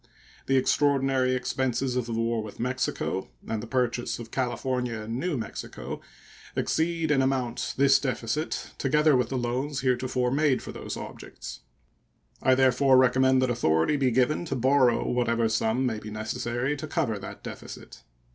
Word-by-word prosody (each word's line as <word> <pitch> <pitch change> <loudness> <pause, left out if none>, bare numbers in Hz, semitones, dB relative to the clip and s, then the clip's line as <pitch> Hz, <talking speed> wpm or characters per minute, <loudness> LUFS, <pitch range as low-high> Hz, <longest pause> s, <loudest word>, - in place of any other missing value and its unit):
The 135 - +3
extraordinary 135 -1 +2
expenses 130 0 -1
of 125 -2 -1
the - - -5
war 115 0 0
with 105 -1 -9
Mexico 125 -6 -2 0.2
and 110 -1 -2
the 115 - -7
purchase 120 0 -1
of 115 -1 -9
California 125 -2 -1
and 115 +3 -4
New 170 -1 -1
Mexico 110 -4 -6 0.5
exceed 165 -1 0
in 135 -2 +4
amount 130 -3 -1
this 135 0 +5
deficit, 130 +3 -2
together 150 +1 +3
with 125 -2 +1
the 135 - -2
loans 130 +4 -2
heretofore 125 -1 0
made 140 -1 +2
for - - -6
those - - -6
objects. - - -8 0.8
I 130 - +4
therefore 130 0 +4
recommend 130 +1 +4
that 130 - +1
authority 80 - +2
be 135 -3 +2
given 125 +7 +2
to 140 - -2
borrow 130 -1 +3
what 125 -1 +1
ever 115 -1 +2
sum 110 +3 +1
may 110 -4 -1
be 105 - -8
necessary 120 +5 -2
to 155 - -6
cover 140 - -1
that 95 - -9
deficit. - - -9
130 Hz, 160 wpm, -27 LUFS, 120-135 Hz, 0.8 s, this